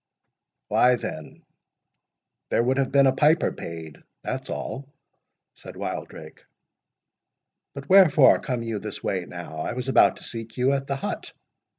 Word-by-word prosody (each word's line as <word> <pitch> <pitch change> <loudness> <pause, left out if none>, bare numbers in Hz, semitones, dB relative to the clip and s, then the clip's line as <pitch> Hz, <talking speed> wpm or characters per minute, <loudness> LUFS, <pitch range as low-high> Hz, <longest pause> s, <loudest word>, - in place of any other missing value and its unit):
"Why, 125 0 +4
there 80 +5 -8
would 130 +3 +1
have 135 - 0
been 140 -1 +5
a 135 - +5
piper 150 +4 +3
paid—that's 80 -2 -8
all," 140 +1 -6 0.6
said - - -12
Wildrake. - - -7 1.3
"But 140 -1 -8
wherefore 160 -8 +6
come 125 -3 -3
you 115 -2 -3
this - - -7
way - - -2
now? 80 - -8
I 80 - -3
was 125 +1 -5
about - - +4
to - - -10
seek 115 0 -6
you 125 +2 +2
at 135 0 -2
the 140 - -1
hut." 135 - -5
130 Hz, 140 wpm, -24 LUFS, 115-140 Hz, 1.3 s, wherefore